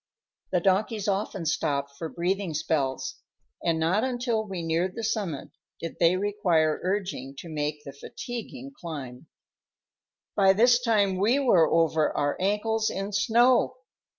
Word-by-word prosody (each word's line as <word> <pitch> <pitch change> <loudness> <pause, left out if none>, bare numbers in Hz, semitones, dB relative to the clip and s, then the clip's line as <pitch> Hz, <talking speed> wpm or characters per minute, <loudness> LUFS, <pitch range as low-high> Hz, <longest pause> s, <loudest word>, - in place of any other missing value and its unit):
The 180 - +3
donkeys 205 +3 +1
often 195 -2 -1
stopped 140 -3 -1
for 160 +2 -5
breathing 180 0 -2
spells, 135 -4 -1 0.5
and 165 -1 +1
not 180 +7 +2
until 245 -3 -1
we 185 -4 -5
neared 170 +3 0
the 230 - -5
summit 205 -9 -2 0.3
did 165 - -6
they 170 +2 +4
require 180 -6 +1
urging 185 -8 -3
to 170 - -8
make 150 -1 -3
the 140 - -9
fatiguing 245 - -7
climb. 145 - -8 1.1
By 195 -1 +5
this 240 +4 +4
time 205 -5 +2
we 225 +7 +3
were 190 - +4
over 160 -2 +2
our 145 0 +1
ankles 215 +3 +1
in 195 +1 -4
snow. 240 +4 +3
185 Hz, 140 wpm, -27 LUFS, 160-215 Hz, 1.1 s, By